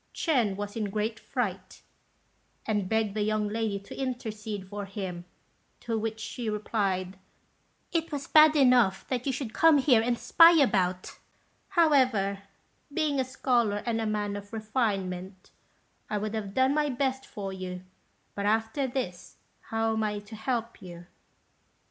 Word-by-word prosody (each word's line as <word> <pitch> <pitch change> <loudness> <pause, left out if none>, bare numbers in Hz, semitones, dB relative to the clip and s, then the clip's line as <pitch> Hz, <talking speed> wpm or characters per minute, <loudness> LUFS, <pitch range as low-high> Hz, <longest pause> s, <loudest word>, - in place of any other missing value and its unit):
Ch'ên 245 - +1
was 205 0 -5
in 215 -2 -1
a - - -6
great 215 +2 -2
fright, 195 -8 -4 0.8
and 205 -4 -1
begged 220 -2 +1
the 215 - -2
young 215 0 0
lady 215 -1 -1
to 200 - -11
intercede 220 -6 -4
for 205 +1 -5
him; 190 -3 -6 0.5
to 230 -1 -3
which 220 0 -3
she 225 +1 -4
replied, 195 -3 -2 0.7
"It 330 -1 -1
was 285 -2 -4
bad 310 0 +6
enough 250 -8 +4
that 255 0 -2
you - - +2
should 245 -3 -5
come 325 -2 +5
here 260 -4 +4
and 240 +1 0
spy 335 +6 +7
about; 185 - +1 0.5
however, 255 - +3 0.5
being 295 -2 0
a - - +3
scholar, 240 -5 0
and 225 -1 0
a 220 - -1
man 210 -1 -1
of 205 0 -8
refinement, 195 -5 -3 0.6
I 210 - -1
would 210 +1 -3
have 205 -3 -4
done 260 +1 +3
my 300 0 +1
best 265 0 -1
for 195 -2 -6
you; 185 -1 -6 0.5
but 200 0 -2
after 225 +6 +1
this, 245 -9 -5 0.3
how 225 0 0
am 220 - -1
I 210 -1 -1
to 205 +2 -9
help 235 0 -3
you?" 175 -1 -10
220 Hz, 155 wpm, -28 LUFS, 200-255 Hz, 0.8 s, spy